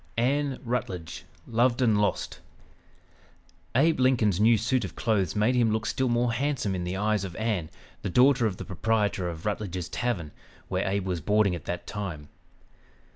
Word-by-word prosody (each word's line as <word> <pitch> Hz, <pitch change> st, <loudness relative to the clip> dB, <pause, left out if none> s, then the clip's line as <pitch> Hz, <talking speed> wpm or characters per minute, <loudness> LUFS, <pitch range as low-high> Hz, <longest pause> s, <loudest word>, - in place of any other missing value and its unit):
ANN 135 Hz, +3 st, +1 dB
RUTLEDGE 95 Hz, -9 st, -4 dB, 0.2 s
"LOVED 120 Hz, +2 st, +2 dB
AND 110 Hz, -4 st, +3 dB
LOST" 105 Hz, -, -1 dB, 1.4 s
Abe 155 Hz, +4 st, +3 dB
Lincoln's 120 Hz, -7 st, +3 dB
new 110 Hz, +2 st, +5 dB
suit 120 Hz, +3 st, 0 dB
of 95 Hz, -, -6 dB
clothes 100 Hz, -7 st, 0 dB
made 105 Hz, +4 st, +3 dB
him 120 Hz, -3 st, +3 dB
look 110 Hz, 0 st, -1 dB
still 130 Hz, -1 st, 0 dB
more 120 Hz, 0 st, +1 dB
handsome 135 Hz, -6 st, -1 dB
in 90 Hz, -1 st, -3 dB
the 90 Hz, +2 st, -3 dB
eyes 105 Hz, 0 st, +1 dB
of 90 Hz, -3 st, -6 dB
Ann, 105 Hz, -8 st, -1 dB, 0.3 s
the 100 Hz, -, -3 dB
daughter 125 Hz, +3 st, +4 dB
of 95 Hz, -3 st, -4 dB
the -, -, -7 dB
proprietor 100 Hz, -1 st, 0 dB
of 80 Hz, -1 st, -8 dB
Rutledge's 100 Hz, -4 st, -3 dB
Tavern, 100 Hz, -11 st, -2 dB, 0.4 s
where -, -, -1 dB
Abe 95 Hz, 0 st, -1 dB
was 90 Hz, -3 st, -2 dB
boarding 105 Hz, +2 st, +2 dB
at 85 Hz, -4 st, -6 dB
that 85 Hz, 0 st, -4 dB
time. 90 Hz, -8 st, -6 dB
105 Hz, 170 wpm, -27 LUFS, 95-120 Hz, 1.4 s, new